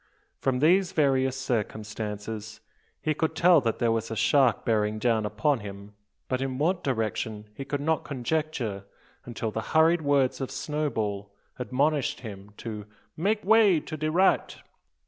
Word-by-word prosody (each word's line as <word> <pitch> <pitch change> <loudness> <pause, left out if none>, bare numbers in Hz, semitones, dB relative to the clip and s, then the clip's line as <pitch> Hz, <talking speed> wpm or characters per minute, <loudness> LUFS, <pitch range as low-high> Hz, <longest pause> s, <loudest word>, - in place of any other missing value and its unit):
From 130 -2 0
these 185 +4 +4
various 130 -3 +2
circumstances 110 -1 -4 0.4
he 155 - +1
could 160 +1 -1
tell 175 -3 +6
that 115 -3 -1
there 115 -1 +2
was 115 0 -1
a 115 - -4
shark 130 0 +3
bearing 105 -1 +1
down 110 -1 +1
upon 145 +4 +1
him; 100 0 -9 0.3
but 130 0 -1
in 135 -1 -2
what 170 +5 0
direction 110 -3 -2
he 135 +5 -7
could 140 +1 -3
not 160 +2 0
conjecture, 130 -7 -2 0.4
until 115 -2 -4
the 110 - -3
hurried 160 +6 +3
words 140 -3 +2
of 135 - -2
Snowball 110 -10 -3 0.3
admonished 140 +3 0
him 100 -3 -9
to 105 -3 -6 0.3
"make 205 +5 0
way 210 -5 +5
to 155 - -7
de 155 0 -2
right." 185 +4 +2
130 Hz, 150 wpm, -27 LUFS, 110-155 Hz, 0.4 s, tell